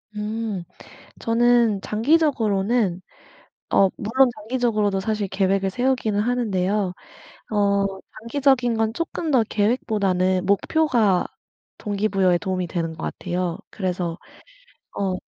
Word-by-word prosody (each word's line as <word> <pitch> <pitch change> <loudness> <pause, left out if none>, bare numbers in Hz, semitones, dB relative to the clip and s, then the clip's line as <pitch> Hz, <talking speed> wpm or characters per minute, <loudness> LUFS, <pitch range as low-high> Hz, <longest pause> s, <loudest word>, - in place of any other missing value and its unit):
음. 210 -2 -3 0.6
저는 235 -2 +3
장기적으로는 220 - +1 0.7
어 195 - +5
물론 250 +5 +3
장기적으로도 215 -3 0
사실 210 0 -2
계획을 195 0 +1
세우기는 245 -2 0
하는데요 205 -5 0 0.6
어 200 -2 +2 0.3
장기적인 250 0 +1
건 220 0 0
쪼끔 335 0 -3
더 255 -5 +4
계획보다는 195 -4 +1
목표가 215 - +2 0.5
동기부여에 195 -3 +1
도움이 185 0 -2
되는 165 -1 -3
것 160 - -10
같아요. 180 -1 -3
그래서 180 -4 -3 0.8
어 195 -2 0
210 Hz, 260 characters per minute, -23 LUFS, 190-235 Hz, 0.8 s, 어